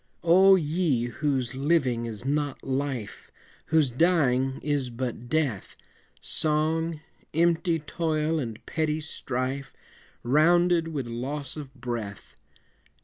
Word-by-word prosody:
O 190 +3 +7
ye 155 -7 +1
whose 135 -2 -1
living 130 -4 +1
is 115 +1 -7
not 145 0 -1
Life, 130 -5 -3 0.4
Whose 155 -5 +3
dying 135 -3 +2
is 145 -4 0
but 120 0 -5
death, 140 -10 -1 0.4
Song, 160 +1 0 0.3
empty 170 +1 +2
toil 155 0 -1
and 115 -6 -6
petty 155 -1 -1
strife, 135 -3 -4 0.5
Rounded 170 +5 +4
with 145 -6 -3
loss 130 +4 -3
of 145 -4 -7
breath! 120 -6 -6
145 Hz, 105 wpm, -27 LUFS, 125-160 Hz, 0.5 s, O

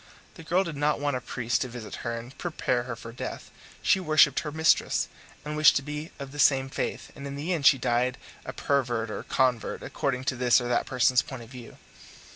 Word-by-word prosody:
The - - -12
girl 175 +4 +1
did 165 -5 -5
not 145 0 +1
want 145 -1 0
a 125 - -3
priest 120 0 -1
to - - -1
visit 120 -3 -8
her 115 0 -3
and 120 +3 -9
prepare 130 -8 -1
her 125 -2 -4
for 115 0 -10
death; 120 - -7 0.3
she - - +4
worshipped 155 -4 +4
her 150 - -5
mistress, 160 +2 +2 0.4
and 150 0 -4
wished 155 0 +6
to 140 - +1
be 150 +3 -5
of 140 -1 -7
the 145 - -9
same 135 -1 +4
faith, - - -4
and 140 -1 -7
in 140 - -6
the 155 +6 -2
end 145 -5 +3
she 135 0 +7
died 125 +1 0 0.3
a - - -5
pervert 120 -5 -1
or - - -4
convert, 125 -3 0
according 130 -2 -2
to 130 - -1
this 120 -1 +4
or 120 - -4
that 120 -1 0
person's 125 0 +3
point 130 -4 -8
of 115 - -14
view. 125 -3 -11
135 Hz, 225 wpm, -27 LUFS, 120-150 Hz, 0.4 s, she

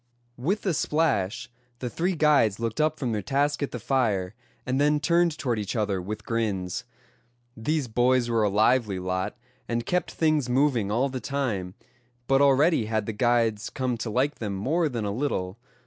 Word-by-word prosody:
With 190 - -1
the 190 - +1
splash 130 -8 0 0.3
the 125 - -4
three 175 +9 -1
guides 145 -10 +3
looked 115 +4 -1
up 155 0 +1
from 130 -5 -2
their 105 -2 -1
task 145 +8 0
at 140 - -1
the - - -5
fire, 110 -6 0 0.3
and 130 +2 0
then 150 +1 +3
turned 170 0 +2
toward 120 -5 -1
each 105 +3 -4
other 100 -4 0
with 105 +3 -6
grins. 100 -6 -2 0.7
These 145 +5 -1
boys 125 +2 +2
were 115 -1 +1
a 105 - +3
lively 110 0 +2
lot, 95 +3 -3 0.3
and 120 0 -1
kept 180 0 0
things 155 -5 +1
moving 125 -5 +2
all 125 +6 +1
the 130 -1 -4
time; 115 -11 -3 0.5
but 135 +1 +3
already 140 -2 +4
had 110 -1 -1
the 110 - -3
guides 115 -1 +1
come 130 -2 -2
to 115 0 -4
like 135 +7 0
them 105 -3 -3
more 155 - 0
than 115 -5 -3
a 100 - -1
little. 100 -5 -2
120 Hz, 180 wpm, -26 LUFS, 105-145 Hz, 0.7 s, already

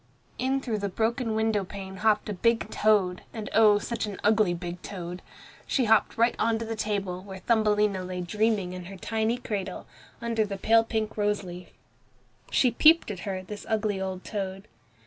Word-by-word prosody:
In 265 +1 +1
through 225 -5 -2
the 200 0 -2
broken 225 +3 -1
window 220 -2 +1
pane 190 0 -8
hopped 210 0 +2
a 210 - -2
big 225 +2 +1
toad, 200 -4 +2 0.3
oh! 215 -2 +6
such 225 +1 -3
an 200 -2 -6
ugly 210 -3 +4
big 175 0 -5
toad. 180 -2 -6 0.5
She 260 - +1
hopped 220 0 +3
right 235 +1 +3
on 225 0 +2
to 225 - -4
the 225 0 -3
table, 200 -4 -2
where 190 0 -9
Thumbelina 210 -3 +2
lay 180 0 -4
dreaming 205 0 0
in 180 -1 -7
her 195 +2 -9
tiny 220 +4 -1
cradle, 195 -6 -4 0.3
under 230 -2 0
the 200 -2 -4
pale 225 +3 +4
pink 220 -1 -3
rose 210 -1 +1
leaf. 180 -1 -9 0.8
She 250 - +3
peeped 315 +2 +5
at 190 - -6
her, 185 -1 -3
this 205 +2 -8
ugly 210 -3 0
old 190 -1 -4
toad. 195 -1 -5
210 Hz, 180 wpm, -27 LUFS, 190-225 Hz, 0.8 s, oh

